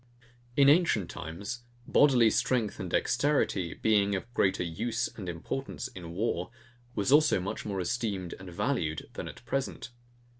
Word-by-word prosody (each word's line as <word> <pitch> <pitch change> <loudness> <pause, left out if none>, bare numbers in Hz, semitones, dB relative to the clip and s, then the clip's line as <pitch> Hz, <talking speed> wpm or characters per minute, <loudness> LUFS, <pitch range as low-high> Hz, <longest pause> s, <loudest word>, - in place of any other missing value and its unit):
In 140 -1 +7
ancient 145 - +4
times, 100 +10 -6 0.2
bodily 125 -6 +5
strength 115 -3 0
and - - -4
dexterity, 120 - +1
being 100 -2 +2
of 115 +5 -6
greater 95 -5 +2
USE 110 +8 -2
and 95 -5 -6
importance 125 +9 -4
in 85 -6 -9
war, 90 -2 -1 0.5
was 105 +4 +1
also 150 -6 +5
much 95 +2 -4
more 100 -2 -2
esteemed 95 -3 -2
and 95 -1 -9
valued, 85 - -2
than - - -5
at - - -11
present. 130 0 -3
105 Hz, 145 wpm, -30 LUFS, 90-125 Hz, 0.5 s, In